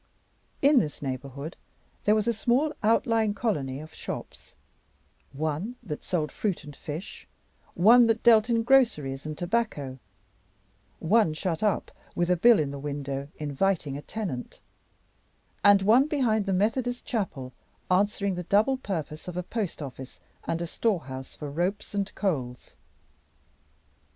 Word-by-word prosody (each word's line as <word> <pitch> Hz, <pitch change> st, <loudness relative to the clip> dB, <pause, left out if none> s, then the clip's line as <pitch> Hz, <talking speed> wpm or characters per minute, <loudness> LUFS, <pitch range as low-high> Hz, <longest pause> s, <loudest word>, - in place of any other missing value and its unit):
In 280 Hz, -1 st, +6 dB
this 150 Hz, -7 st, -3 dB
neighborhood 140 Hz, +3 st, -5 dB, 0.5 s
there 210 Hz, -, +5 dB
was 215 Hz, +1 st, 0 dB
a 235 Hz, -, +3 dB
small 255 Hz, +7 st, +1 dB
outlying 225 Hz, -1 st, +2 dB
colony 145 Hz, -, -1 dB
of 155 Hz, +1 st, -11 dB
shops: -, -, -8 dB, 0.8 s
one 155 Hz, -, -3 dB
that 155 Hz, -9 st, -5 dB
sold 160 Hz, -4 st, -1 dB
fruit 200 Hz, -7 st, -2 dB
and 145 Hz, -1 st, -10 dB
fish; 155 Hz, +9 st, -7 dB, 0.5 s
one 230 Hz, +7 st, +7 dB
that 225 Hz, 0 st, +1 dB
dealt 225 Hz, -1 st, +6 dB
in 230 Hz, -1 st, +2 dB
groceries 155 Hz, -, +2 dB
and 155 Hz, -1 st, -5 dB
tobacco; 175 Hz, -, -2 dB, 1.0 s
one 180 Hz, -2 st, +3 dB
shut 165 Hz, -1 st, -2 dB
up, 210 Hz, -2 st, 0 dB, 0.2 s
with 175 Hz, +1 st, +1 dB
a -, -, +5 dB
bill 230 Hz, +6 st, +6 dB
in 145 Hz, -2 st, -1 dB
the 140 Hz, -, -6 dB
window 140 Hz, -1 st, -4 dB
inviting 150 Hz, 0 st, -1 dB
a 145 Hz, -, -5 dB
tenant; 170 Hz, -, -5 dB, 1.0 s
and 200 Hz, -1 st, +6 dB
one, 240 Hz, +8 st, +5 dB
behind 230 Hz, -9 st, +1 dB
the -, -, +1 dB
Methodist 235 Hz, +6 st, 0 dB
Chapel, 150 Hz, -, -3 dB, 0.4 s
answering 200 Hz, +1 st, +2 dB
the 180 Hz, -, -3 dB
double 220 Hz, +7 st, +3 dB
purpose 160 Hz, -, -5 dB
of 180 Hz, -1 st, -5 dB
a 180 Hz, -, -1 dB
post 195 Hz, -6 st, -3 dB
office 130 Hz, -1 st, -9 dB, 0.3 s
and 165 Hz, +1 st, -1 dB
a -, -, -2 dB
storehouse 145 Hz, -, -2 dB
for 150 Hz, -2 st, -6 dB
ropes 180 Hz, +9 st, -2 dB
and 200 Hz, -1 st, -1 dB
coals. 130 Hz, -11 st, -3 dB
185 Hz, 140 wpm, -27 LUFS, 145-220 Hz, 1.0 s, one